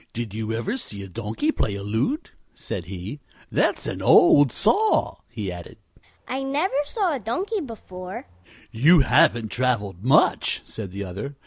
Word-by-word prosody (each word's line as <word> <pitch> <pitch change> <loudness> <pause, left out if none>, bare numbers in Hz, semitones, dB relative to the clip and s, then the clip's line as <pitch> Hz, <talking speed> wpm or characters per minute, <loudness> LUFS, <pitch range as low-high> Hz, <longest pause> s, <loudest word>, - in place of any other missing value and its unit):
"Did 115 -3 -5
you 110 0 -3
ever 180 - -2
see 105 - -6
a - - -8
donkey 110 - -2
play 105 - -2
a 100 - -6
lute?" 115 - -2 0.2
said 90 - -6
he. 95 - -7 0.3
"That's - - +1
an - - -4
old 145 -4 +6
saw," 415 - +2
he - - -5
added. - - -10 0.5
"I 265 +1 -3
never 285 +7 -1
saw 380 0 -1
a - - -4
donkey 370 - -2
before," 185 - -8
said 90 0 -29 0.2
Buddie. 115 +3 -8
"You 170 +2 +8
haven't 115 -3 +3
traveled 105 -8 -1
much," 130 - +3
said 105 -4 -7
the 100 +2 -6
other. 100 +10 -6
120 Hz, 165 wpm, -24 LUFS, -, 0.5 s, You